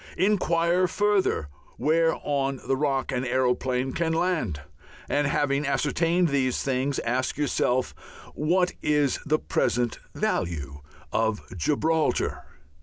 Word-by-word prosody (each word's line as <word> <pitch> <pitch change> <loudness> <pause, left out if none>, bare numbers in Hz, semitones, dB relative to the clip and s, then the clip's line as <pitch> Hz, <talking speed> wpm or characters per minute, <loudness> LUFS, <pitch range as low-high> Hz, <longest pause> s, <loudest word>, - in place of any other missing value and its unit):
Inquire 180 -2 +2
further 205 - +1 0.3
where 165 +1 +2
on 135 -2 -1
the 135 - +1
Rock 135 -2 0
an 125 -1 -1
aeroplane 130 0 0
can 165 -1 0
land. 160 - 0 0.5
And 145 0 +1
having 140 0 +1
ascertained 165 +5 +1
these 130 -3 0
things, 135 +1 0
ask 125 +3 -1
yourself 130 -3 0 0.4
what 180 +4 +1
is 150 -2 +1
the 155 +1 +3
present 120 -5 0 0.2
value 75 -5 -2 0.3
of 110 -1 0
Gibraltar? 155 - 0
140 Hz, 110 wpm, -26 LUFS, 125-165 Hz, 0.5 s, the